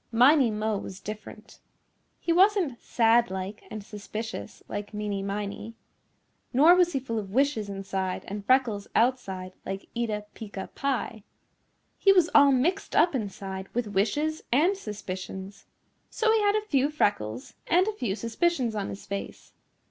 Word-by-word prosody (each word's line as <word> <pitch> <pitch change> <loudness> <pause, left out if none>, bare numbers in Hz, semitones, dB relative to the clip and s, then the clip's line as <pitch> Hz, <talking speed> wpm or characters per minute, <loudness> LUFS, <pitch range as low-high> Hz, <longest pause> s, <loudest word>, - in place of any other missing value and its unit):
Miney 255 +2 +6
Mo 215 -1 -1
was 190 -1 -8
different. 215 +1 -9 0.6
He 335 - 0
wasn't 365 - +3
sad 235 0 +3
like 190 +2 -5
and 215 -2 -6
suspicious 210 - -7
like 205 +1 -6
Meeny 205 -1 -2
Miney. 205 +3 -4 0.8
Nor 300 +7 +7
was 360 -1 +3
he 270 - +1
full 230 -4 -3
of 200 -2 -6
wishes 250 -2 +1
inside 195 -1 -3
and 205 +1 -5
freckles 230 -4 +2
outside 195 -7 0
like 195 0 -6
Eeta 215 -3 -2
Peeca 200 -3 -8
Pie. 265 -5 -2 0.8
He 390 - +6
was 360 -4 +4
all 285 -1 +7
mixed 290 +9 0
up 340 - +5
inside 195 -4 -4
with 240 -3 -1
wishes 290 +11 0
and 325 +11 +4
suspicions. 195 - -7 0.4
So 445 -1 +1
he 445 -1 +3
had 410 0 +3
a 430 0 0
few 280 -7 +2
freckles 125 - -1
and 360 +3 +4
a 435 - 0
few 235 - -2
suspicions 235 +2 0
on 205 -2 -3
his 195 - -8
face. 200 0 -6
220 Hz, 150 wpm, -27 LUFS, 200-285 Hz, 0.8 s, Nor